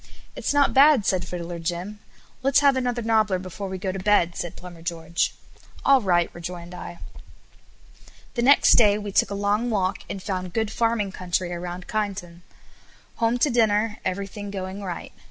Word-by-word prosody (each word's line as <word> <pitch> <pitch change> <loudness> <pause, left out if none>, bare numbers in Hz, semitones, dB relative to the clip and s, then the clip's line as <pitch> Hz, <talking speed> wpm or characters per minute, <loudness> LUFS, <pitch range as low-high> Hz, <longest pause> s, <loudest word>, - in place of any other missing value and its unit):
"It's - - -1
not 285 -1 +3
bad," 275 -5 +6
said 185 -2 0
Fiddler 170 -1 -5
Jim. 175 +5 -4 0.4
"Let's 275 +2 +4
have 280 -1 +5
another 245 -2 -1
nobbler 220 -4 +2
before 185 +2 -6
we 190 - -4
go 190 0 -2
to 190 - -5
bed," 185 -3 +2
said 175 - -5
Plumber 175 -2 -11
George. 170 0 -2 0.5
"All 275 -1 +6
right," 175 -4 +2
rejoined 175 0 -7
I. 175 -1 -8 1.4
The 240 - -1
next 275 +4 +6
day 210 -3 +6
we 205 -1 -5
took - - +3
a 200 - -3
long 205 +4 0
walk; 195 -3 0
and 195 - -4
found 185 -2 -4
good 220 -2 -1
farming 225 -3 0
country 180 -1 -2
around 175 +1 -6
Kyneton. 195 -5 -4 0.8
Home 230 +1 +1
to 280 +3 +2
dinner, 220 -2 +2
everything 200 +2 -4
going 190 0 -5
right. 180 -4 -6
200 Hz, 170 wpm, -24 LUFS, 180-225 Hz, 1.4 s, bad